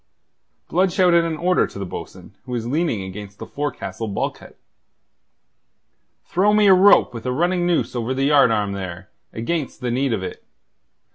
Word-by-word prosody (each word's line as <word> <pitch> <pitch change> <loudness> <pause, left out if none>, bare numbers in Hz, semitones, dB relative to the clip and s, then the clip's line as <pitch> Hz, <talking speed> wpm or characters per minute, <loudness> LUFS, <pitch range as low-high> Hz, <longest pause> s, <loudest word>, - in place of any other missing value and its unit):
Blood 185 +2 +1
shouted 175 -2 +3
an 165 -1 -3
order 180 +3 +2
to - - -12
the 100 - -4
bo'sun, 90 - -9
who 125 - -7
was 115 -2 -2
leaning 140 - -1
against 100 +1 -9
the - - -8
forecastle 145 -5 -5
bulkhead. 100 - -4 1.7
"Throw 200 +4 +2
me 210 0 +4
a 195 - +7
rope 190 -4 +5
with 115 +1 -7
a - - 0
running 175 +5 0
noose 170 -6 0
over 120 +1 -2
the 135 +1 0
yardarm 115 -8 +3
there, 95 -1 -7 0.2
against 140 +6 -3
the 125 -1 -2
need 130 +2 0
of 105 -4 -2
it. - - -7
130 Hz, 165 wpm, -21 LUFS, 110-175 Hz, 1.7 s, a